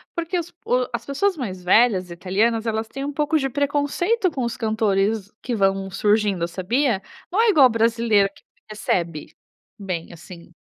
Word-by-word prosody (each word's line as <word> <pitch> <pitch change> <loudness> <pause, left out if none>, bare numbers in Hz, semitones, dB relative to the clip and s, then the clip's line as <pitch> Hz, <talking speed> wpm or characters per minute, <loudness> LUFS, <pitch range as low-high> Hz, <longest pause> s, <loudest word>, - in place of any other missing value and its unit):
porque 340 +1 -1
os 340 - -6
pu 250 -7 -1
as 235 - -4
pessoas 365 +7 0
mais 190 -9 -5
velhas 190 -2 +3
italianas, 210 +6 0
elas 220 0 -1
têm 275 +4 -6
um 290 - -4
pouco 300 +2 +1
de 270 -2 -1
preconceito 295 - 0
com 265 - -3
os 235 -1 -3
cantores 215 -2 0
que 245 - -3
vão 195 -1 +1
surgindo 205 -3 +1
sabia, 200 +5 0 0.3
não 410 - +2
é 460 - +4
igual 285 -9 +7
o - - -4
brasileiro 225 -3 +2
que - - -21 0.3
recebe, 170 -7 -3 0.4
bem 185 -4 -5
assim. 170 0 -13
225 Hz, 170 wpm, -22 LUFS, 195-280 Hz, 0.4 s, igual